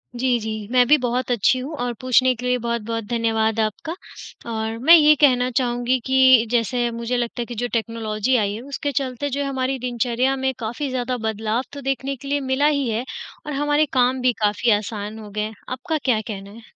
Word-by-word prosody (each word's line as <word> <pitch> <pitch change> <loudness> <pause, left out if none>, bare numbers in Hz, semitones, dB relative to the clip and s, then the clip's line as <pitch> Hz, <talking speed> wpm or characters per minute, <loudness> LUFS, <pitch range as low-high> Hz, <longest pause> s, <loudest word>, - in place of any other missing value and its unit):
जी, 245 -1 +1
जी, 220 0 -4 0.2
मैं 250 -1 +5
भी 300 +3 +6
बहुत 250 0 -1
अच्छी 245 +3 +2
हूँ 275 +5 -6
और 245 -1 -2
पूछने 255 0 +4
के 245 +2 -8
लिए 250 0 +2
बहुत-बहुत 230 -1 -3
धन्यवाद 225 -1 0
आपका। 220 - -2 0.6
और 220 0 -3
मैं 320 +8 +8
ये 305 -2 +6
कहना 250 -3 +4
चाहूँगी 245 0 +1
कि 260 -3 +5
जैसे 240 0 +1
मुझे 235 +1 -2
लगता 240 0 -2
है 235 - -3
कि 240 - -8
जो 245 +2 -2
टेक्नोलॉजी 225 +1 -1
आई 205 -3 0
है 220 - -6
उसके 285 +1 -3
चलते 260 +1 -3
जो 280 +1 -2
है 280 - -1
हमारी 265 0 -1
दिनचर्या 250 +2 0
में 265 0 -1
काफ़ी 240 +5 -3
ज़्यादा 255 -1 -2
बदलाव 220 +3 -1
तो 285 - -7
देखने 270 0 -2
के 275 +2 -11
लिए 285 +1 0
मिला 285 +3 +3
ही 280 -4 +1
है 225 +2 -1 0.4
और 300 - -4
हमारे 295 +2 +2
काम 255 0 +2
भी 250 -1 +3
काफ़ी 210 +3 +2
आसान 210 +1 -6
हो 210 -1 -10
गए 210 +1 -3
हैं, 215 +1 -3 0.2
आपका 260 +6 -2
क्या 235 -5 +2
कहना 200 -3 -7
है? 225 +3 -12
245 Hz, 210 wpm, -22 LUFS, 225-265 Hz, 0.6 s, मैं